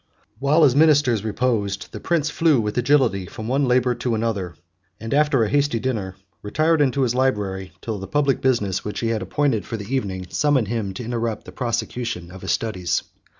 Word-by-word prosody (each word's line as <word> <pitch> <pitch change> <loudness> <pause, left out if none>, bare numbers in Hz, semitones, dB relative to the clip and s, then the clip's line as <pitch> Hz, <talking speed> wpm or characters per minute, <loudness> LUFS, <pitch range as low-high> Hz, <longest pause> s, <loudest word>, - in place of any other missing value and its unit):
While 145 +4 +3
his 135 -4 +5
ministers 145 -8 +4
reposed, 105 -3 -1
the - - -7
prince 165 -3 0
flew 160 -6 +3
with 105 -1 -2
agility 125 -7 +2
from 110 +4 -7
one 135 +3 +1
labor 125 0 +3
to 120 -1 -2
another, 105 -6 -2 0.4
and, 115 +2 -4
after 145 -4 +3
a 105 - 0
hasty 145 -4 +1
dinner, 105 -7 -3 0.3
retired 155 +9 +1
into 140 -1 +2
his 120 -2 +1
library, 100 -8 -1
till 110 -3 -4
the 95 - -7
public 140 +4 +1
business, 105 -8 +1
which 105 - -4
he 115 - 0
had 110 -2 -1
appointed 110 +3 0
for 115 - -5
the 105 +4 -6
evening, 95 -8 -2
summoned 140 -8 +2
him 105 -5 -2
to 120 - -5
interrupt 115 -2 -3
the - - -10
prosecution 120 -6 -3
of 95 0 -11
his - - -2
studies. 95 -6 -1
115 Hz, 195 wpm, -22 LUFS, 105-135 Hz, 0.4 s, his